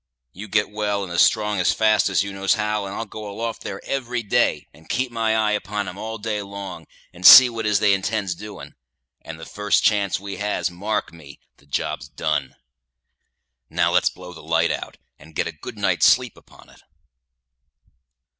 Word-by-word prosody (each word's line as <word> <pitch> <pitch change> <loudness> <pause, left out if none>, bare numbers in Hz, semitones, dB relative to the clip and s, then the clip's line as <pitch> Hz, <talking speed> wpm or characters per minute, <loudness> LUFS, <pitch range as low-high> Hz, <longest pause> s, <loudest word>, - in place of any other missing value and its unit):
You 105 +4 -9
get 105 0 0
well 105 -1 -2
and 85 0 -3
strong 105 -2 +3
as 90 - +2
fast 110 -2 +3
as 95 -1 +2
you 100 0 -6
knows 95 +2 +1
how, 105 -2 -2
and 95 - -7
I'll 115 - -4
go 105 0 -8
aloft 115 +3 -5
there 95 - -6
every 125 -3 -3
day, 105 - +1
and 80 +2 -20
keep 130 -1 -1
my 115 -1 0
eye 110 -1 +2
upon 105 -1 -3
'em 90 - -7
all 110 +1 -5
day 105 -1 -3
long, 100 -5 -8 0.3
and 90 0 -13
see 125 +6 +11
what 115 -1 -4
'tis 105 -2 +2
they 105 -2 +4
intends 100 0 -1
doing; 105 +4 -10 0.5
and 80 0 -9
the 80 - -9
first 105 0 0
chance 100 -4 +2
we 100 0 -7
has, 105 -3 -2
mark 105 +4 -3
me, 75 -4 -14 0.2
the 70 - -26
job's 70 -1 -3
done. 75 -2 -2 1.1
Now, - - +1
let's - - +3
blow - - -12
the - - -12
light - - +1
out, - - -5 0.2
and 80 +2 -17
get - - 0
a - - -4
good - - -10
night's - - +3
sleep - - +3
upon - - -19
it." - - -20
105 Hz, 190 wpm, -22 LUFS, 90-110 Hz, 1.1 s, see